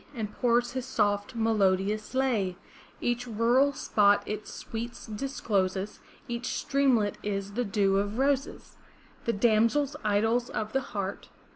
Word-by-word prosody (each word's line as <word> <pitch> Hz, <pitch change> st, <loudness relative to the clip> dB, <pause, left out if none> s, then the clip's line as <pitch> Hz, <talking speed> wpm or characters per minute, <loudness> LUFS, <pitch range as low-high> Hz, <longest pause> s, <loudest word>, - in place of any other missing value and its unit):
And 215 Hz, -3 st, -4 dB
pours 240 Hz, 0 st, +2 dB
his 260 Hz, 0 st, -4 dB
soft 205 Hz, -2 st, 0 dB
melodious 210 Hz, -1 st, +1 dB
lay; 220 Hz, -9 st, +1 dB, 0.4 s
Each 240 Hz, +1 st, -1 dB
rural 240 Hz, +5 st, +3 dB
spot 205 Hz, -6 st, +3 dB
its 215 Hz, 0 st, -5 dB
sweets 235 Hz, +1 st, -6 dB
discloses. 205 Hz, -5 st, -2 dB, 0.3 s
Each 240 Hz, +1 st, -3 dB
streamlet 255 Hz, -9 st, +1 dB
is 200 Hz, -1 st, -3 dB
the 245 Hz, +3 st, 0 dB
dew 195 Hz, -1 st, +2 dB
of 205 Hz, +2 st, -2 dB
roses; 275 Hz, +1 st, -1 dB, 0.5 s
The 235 Hz, -, +1 dB
damsels, 230 Hz, +7 st, +2 dB
idols 225 Hz, +4 st, +1 dB
of 215 Hz, 0 st, -4 dB
the 270 Hz, -, +2 dB
heart. 200 Hz, -5 st, -5 dB
220 Hz, 130 wpm, -28 LUFS, 205-245 Hz, 0.5 s, rural